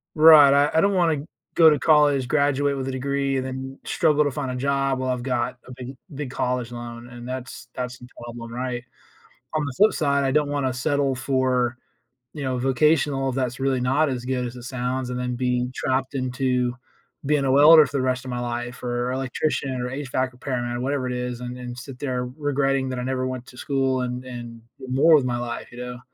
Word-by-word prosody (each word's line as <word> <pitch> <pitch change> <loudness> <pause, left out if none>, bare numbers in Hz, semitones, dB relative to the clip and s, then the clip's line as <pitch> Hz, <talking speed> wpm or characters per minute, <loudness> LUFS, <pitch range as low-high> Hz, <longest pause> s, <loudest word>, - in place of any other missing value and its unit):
Right, 155 -3 +8
I 145 +1 +4
I - - +6
don't 200 +2 +3
wanna 160 -5 +1 0.3
go 165 -2 +8
to 150 - +2
college, 145 -4 +4
graduate 145 0 +2
with 135 0 -3
a - - -1
degree, 140 +1 -1
and 130 - -2
then 130 +1 -6
struggle 150 -3 +2
to 145 - 0
find 135 -2 -3
a - - -4
job 135 0 0
while 130 0 -2
I've 125 -1 -3
got 125 -2 -1
a - - -10
big 130 +1 -8 0.2
big 140 -2 -5
college 125 -1 -2
loan 120 0 -8
and 120 0 -9
that's 130 0 -7
that's 125 0 -5
the 125 - -12
problem, 120 -1 -8
right? 125 0 -3 0.7
On 155 -1 +1
the 140 - -4
flip 215 +1 +5
side, 140 -3 +1
I 135 - +1
don't 150 +1 +2
wanna 140 -3 0
settle 140 +1 0
for 130 -2 0 0.6
you 150 - -6
know, 130 -1 -1
vocational 135 +1 +2
if 130 - -3
that's 130 -1 -2
really 135 -2 +1
not 135 +5 +2
as 125 -2 -3
good 125 -1 -1
as 120 - -6
it 125 - -10
sounds 125 0 -3
and 125 - -3
then 125 0 -2
being 125 0 0
trapped 130 +1 -1
into 125 -1 0 0.5
being 145 0 +2
a 130 - +2
welder 150 +3 +8
for 140 +1 -3
the 130 - +1
rest 130 0 0
of 130 - -5
my 120 - -3
life 120 0 -4
or 120 0 -1
electrician 130 0 -2
or 125 - -3
HVAC 130 -1 -2
repairman 125 -1 -3
or 120 - -4
whatever 135 -1 -1
it 125 - -2
is, 125 -1 -3
and 125 0 -6
and 125 -1 -7
sit 130 0 -9
there 125 -3 -2
regretting 135 -2 0
that 130 -1 -3
I - - -3
never 130 0 -1
went 130 -1 -5
to 125 - -14
school 135 -2 0
and 125 0 -4
and, 120 -2 -8 0.2
do 130 - -9
more 145 +5 +5
with 140 -4 +3
my 120 -1 -1
life, 120 -1 -5
you 120 - -12
know? 125 0 -6
130 Hz, 225 wpm, -24 LUFS, 125-140 Hz, 0.7 s, Right